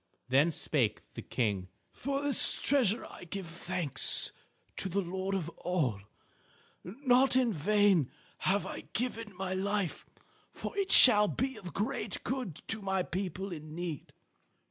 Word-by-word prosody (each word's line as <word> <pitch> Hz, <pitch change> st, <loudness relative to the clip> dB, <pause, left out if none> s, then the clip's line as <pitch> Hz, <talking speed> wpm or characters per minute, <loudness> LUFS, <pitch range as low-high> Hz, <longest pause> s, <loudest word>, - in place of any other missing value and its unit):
Then 140 Hz, +6 st, +3 dB
spake 125 Hz, -9 st, -1 dB
the -, -, -7 dB
King: 100 Hz, -6 st, -2 dB, 0.2 s
"For 275 Hz, +2 st, -3 dB
this 285 Hz, -1 st, +5 dB
treasure 245 Hz, -6 st, +2 dB
I -, -, -12 dB
give 190 Hz, +2 st, -6 dB
thanks 170 Hz, -4 st, 0 dB, 0.5 s
to 190 Hz, -, -2 dB
the 195 Hz, +3 st, -1 dB
Lord 190 Hz, +1 st, -3 dB
of 175 Hz, -5 st, -3 dB
All. 145 Hz, -, -1 dB, 0.8 s
Not 255 Hz, +6 st, +2 dB
in 250 Hz, -4 st, +2 dB
vain 195 Hz, -3 st, +2 dB, 0.3 s
have 200 Hz, +2 st, 0 dB
I -, -, -6 dB
given 230 Hz, -3 st, -3 dB
my 190 Hz, 0 st, -3 dB
life, 195 Hz, -1 st, -2 dB, 0.4 s
for -, -, -7 dB
it 395 Hz, -1 st, -1 dB
shall 210 Hz, -4 st, +9 dB
be 260 Hz, +5 st, -2 dB
of 180 Hz, -3 st, -9 dB
great 210 Hz, -2 st, -3 dB
good 250 Hz, -, -4 dB
to 220 Hz, -1 st, 0 dB
my 190 Hz, -1 st, -1 dB
people 190 Hz, +1 st, -5 dB
in 155 Hz, -2 st, -8 dB
need. 170 Hz, -5 st, -6 dB
190 Hz, 145 wpm, -31 LUFS, 170-225 Hz, 0.8 s, shall